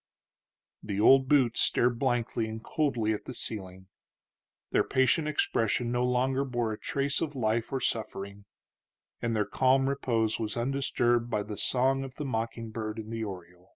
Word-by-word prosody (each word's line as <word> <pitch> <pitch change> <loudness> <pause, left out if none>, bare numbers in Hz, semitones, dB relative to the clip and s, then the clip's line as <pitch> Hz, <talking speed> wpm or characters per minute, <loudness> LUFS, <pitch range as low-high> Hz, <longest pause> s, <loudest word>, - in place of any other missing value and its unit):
The 100 -1 -4
old 135 +4 +6
boots 130 -5 +3
stared 120 -1 +2
blankly 120 -3 0
and 110 0 -7
coldly 120 -9 0
at 105 - -6
the - - -6
ceiling; 95 -3 -5 0.9
their - - +3
patient 130 +4 +2
expression 120 -5 0
no 120 0 +1
longer 130 +2 +1
bore 120 -4 -1
a 105 - -8
trace 140 +1 -1
of 150 -3 -2
life 115 -2 0
or 135 - -1
suffering, 100 -4 -3 0.8
and 115 -1 -1
their 105 -1 +1
calm 130 +5 +2
repose 115 -5 0
was 110 0 -3
undisturbed 120 -2 +1
by 105 - 0
the 105 0 -6
song 135 +4 +1
of 135 -1 -8
the 150 - -5
mocking 115 -2 -3
bird 110 -1 -4
in 110 0 -7
the 115 -1 -3
oriel. 90 -3 -9
120 Hz, 165 wpm, -29 LUFS, 110-130 Hz, 0.9 s, old